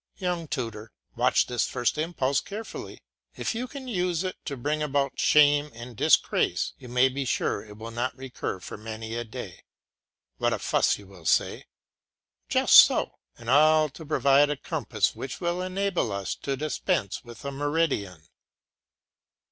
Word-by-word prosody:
Young 180 Hz, -4 st, -2 dB
tutor, 115 Hz, -7 st, -5 dB, 0.2 s
watch -, -, +3 dB
this 120 Hz, -2 st, -1 dB
first 120 Hz, -2 st, 0 dB
impulse 150 Hz, -4 st, 0 dB
carefully. 215 Hz, +3 st, -8 dB, 0.3 s
If -, -, -2 dB
you 240 Hz, +3 st, -3 dB
can 270 Hz, 0 st, -9 dB
use 180 Hz, -6 st, -1 dB
it 185 Hz, -, -3 dB
to 140 Hz, -, -4 dB
bring 150 Hz, +5 st, -1 dB
about 140 Hz, -2 st, -1 dB
shame 145 Hz, 0 st, +5 dB
and 120 Hz, +1 st, -9 dB
disgrace, -, -, +2 dB
you 125 Hz, -, -11 dB
may 125 Hz, +2 st, +4 dB
be 135 Hz, +1 st, -3 dB
sure 110 Hz, -4 st, -1 dB
it 105 Hz, -1 st, -13 dB
will 115 Hz, +1 st, -7 dB
not 120 Hz, +2 st, -3 dB
recur 130 Hz, -7 st, -5 dB
for -, -, -8 dB
many 110 Hz, +1 st, -7 dB
a 120 Hz, 0 st, -2 dB
day. 110 Hz, -, -8 dB, 0.8 s
What -, -, +2 dB
a -, -, 0 dB
fuss -, -, +2 dB
you 100 Hz, -, -14 dB
will 95 Hz, -4 st, -15 dB
say. -, -, +1 dB, 0.8 s
Just -, -, +6 dB
so; -, -, +6 dB, 0.2 s
and 115 Hz, -, -13 dB
all 155 Hz, +3 st, +5 dB
to 150 Hz, +4 st, -11 dB
provide 140 Hz, -1 st, +4 dB
a 150 Hz, -, -1 dB
compass -, -, -1 dB
which 135 Hz, -, -6 dB
will 175 Hz, 0 st, -1 dB
enable 185 Hz, -, -1 dB
us 100 Hz, -1 st, -3 dB
to 135 Hz, -1 st, -4 dB
dispense 135 Hz, -7 st, -1 dB
with 120 Hz, +2 st, -12 dB
a 140 Hz, -, -2 dB
meridian! 140 Hz, -, -1 dB
140 Hz, 165 wpm, -26 LUFS, 115-155 Hz, 0.8 s, Just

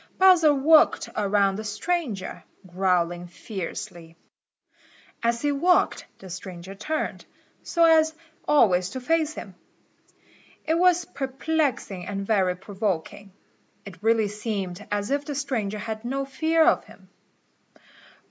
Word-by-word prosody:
Bowser 360 Hz, -5 st, +6 dB
walked 300 Hz, +3 st, +4 dB
around 200 Hz, -1 st, +2 dB
the 215 Hz, -, -5 dB
stranger, 220 Hz, -, -3 dB, 0.2 s
growling 175 Hz, -1 st, 0 dB
fiercely. 175 Hz, -3 st, -7 dB, 1.0 s
As 235 Hz, +2 st, 0 dB
he 290 Hz, -, +2 dB
walked 350 Hz, +6 st, +2 dB
the 190 Hz, -, -12 dB
stranger 185 Hz, 0 st, -8 dB
turned, 305 Hz, +11 st, -3 dB, 0.4 s
so 335 Hz, -, +1 dB
as 315 Hz, -1 st, +4 dB, 0.3 s
always 185 Hz, -11 st, +4 dB
to 260 Hz, -, -5 dB
face 315 Hz, +3 st, 0 dB
him. 195 Hz, -4 st, -8 dB, 1.1 s
It 320 Hz, -, +1 dB
was 355 Hz, -1 st, +4 dB
perplexing 270 Hz, -, -2 dB
and 195 Hz, -1 st, -4 dB
very 190 Hz, -4 st, +2 dB
provoking. 200 Hz, +1 st, -4 dB, 0.5 s
It 200 Hz, -1 st, -11 dB
really 225 Hz, -1 st, +3 dB
seemed 205 Hz, -2 st, -5 dB
as 205 Hz, +3 st, -2 dB
if 285 Hz, +1 st, 0 dB
the 290 Hz, 0 st, -5 dB
stranger 230 Hz, -7 st, -2 dB
had 220 Hz, +1 st, -5 dB
no 270 Hz, +3 st, -2 dB
fear 320 Hz, +4 st, +2 dB
of -, -, +3 dB
him. -, -, -17 dB
215 Hz, 120 wpm, -25 LUFS, 195-290 Hz, 1.1 s, Bowser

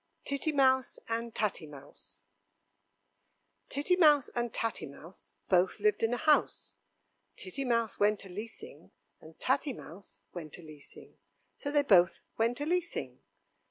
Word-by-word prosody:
Titty 280 Hz, +3 st, 0 dB
Mouse 260 Hz, -3 st, +3 dB
and 230 Hz, 0 st, -3 dB
Tatty 195 Hz, -6 st, -1 dB
Mouse 145 Hz, -1 st, -13 dB, 1.5 s
Titty 295 Hz, +6 st, +2 dB
Mouse 300 Hz, -6 st, +5 dB
and 240 Hz, -1 st, -2 dB
Tatty 225 Hz, -7 st, -2 dB
Mouse 160 Hz, +6 st, -13 dB, 0.2 s
both 185 Hz, +2 st, +2 dB
lived 210 Hz, 0 st, +2 dB
in 225 Hz, -, +2 dB
a 245 Hz, -, 0 dB
house, 305 Hz, +3 st, +1 dB, 0.6 s
Titty 275 Hz, -7 st, -4 dB
Mouse 230 Hz, -3 st, 0 dB
went 205 Hz, -1 st, +2 dB
a -, -, -11 dB
leasing 210 Hz, +5 st, -9 dB, 0.3 s
and 160 Hz, 0 st, -16 dB
Tatty 275 Hz, +1 st, +1 dB
Mouse 195 Hz, -2 st, -12 dB
went 160 Hz, -4 st, -7 dB
a 175 Hz, -, -13 dB
leasing, 155 Hz, -2 st, -14 dB, 0.4 s
So 285 Hz, -, -5 dB
they 290 Hz, -1 st, +3 dB
both 180 Hz, -9 st, +4 dB
went 230 Hz, +3 st, 0 dB
a 290 Hz, -, -2 dB
leasing. 350 Hz, +1 st, -2 dB
230 Hz, 140 wpm, -31 LUFS, 185-280 Hz, 1.5 s, Mouse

